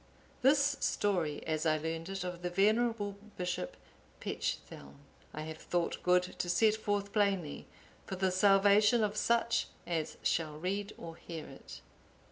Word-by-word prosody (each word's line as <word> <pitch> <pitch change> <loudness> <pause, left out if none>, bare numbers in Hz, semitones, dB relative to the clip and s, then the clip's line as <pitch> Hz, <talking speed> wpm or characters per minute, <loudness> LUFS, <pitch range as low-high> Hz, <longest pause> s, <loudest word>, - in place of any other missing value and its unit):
(848) 260 - +6
This 285 0 +3
story, 175 -8 0
as 155 -1 -1
I 155 -1 +3
learned 165 +2 -4
it 195 -1 -3
of 180 -1 -5
the 175 - -2
venerable 205 +2 +2 0.2
Bishop 180 - -3 0.4
Pechthelm,(849) 70 0 -4 0.4
I 155 - -4
have 160 0 -6
thought 175 -1 -1
good 180 0 +4
to 180 -1 -4
set 210 +5 +4
forth 205 -2 -2
plainly, 195 -8 0 0.4
for 190 - -3
the 190 0 +1
salvation 205 +4 +5
of 210 0 0
such 235 +2 +2 0.2
as 165 -3 -2
shall 155 -2 0
read 200 +5 -2
or 165 -1 -8
hear 165 -2 -7
it. - - -11
185 Hz, 150 wpm, -33 LUFS, 165-205 Hz, 0.4 s, 848